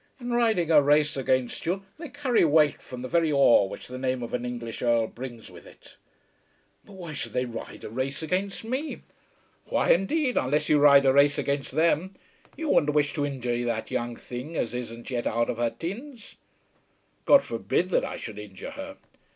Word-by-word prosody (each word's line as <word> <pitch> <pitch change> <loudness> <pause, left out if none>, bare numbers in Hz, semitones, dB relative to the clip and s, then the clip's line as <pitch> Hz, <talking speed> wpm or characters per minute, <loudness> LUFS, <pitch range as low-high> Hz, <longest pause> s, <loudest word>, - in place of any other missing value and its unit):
In 245 -1 -5
riding 220 -9 +2
a 150 -2 +7
race 150 +1 +3
against 130 +1 -1
you 190 +3 -1
they 325 -3 -7
carry 260 -3 +1
weight 150 -2 +3
from 125 0 -9
the - - -3
very 165 +1 +2
awe 135 -7 +5
which 95 - -8
the 125 +1 -8
name 130 -1 -1
of 115 - -7
an 125 0 -2
English 120 -2 -5
Earl 120 -2 +2
brings 120 -1 -9
with - - -14
it." - - -17 0.9
"Why 185 -6 -9
should - - -4
they 125 0 0
ride 115 -2 -8
a - - -6
race 135 +5 -3
against 190 +6 -2
me?" 260 +7 -4 0.6
"Why - - +1
indeed, 255 - +1
unless 145 +4 +1
you 150 - +5
ride 140 -1 +7
a 135 - +5
race 140 +1 +4
against 140 -2 -2
them! 165 +4 +1 0.4
You 320 -2 -3
wouldn't 150 - +3
wish 145 -1 +2
to 145 -1 -1
injure 120 -3 -2
that 115 -2 -3
young 120 0 -2
thing 125 +9 -8
as 115 - -2
isn't 120 0 -6
yet 120 -2 -1
out 115 +1 0
of 115 - -7
her 120 0 +1
teens?" 210 - -8 0.9
"God 280 -1 +6
forbid 115 - -1
that - - +2
I - - -4
should 105 -2 -7
injure 105 - -9
her." 285 +1 -8
145 Hz, 190 wpm, -26 LUFS, 120-185 Hz, 0.9 s, a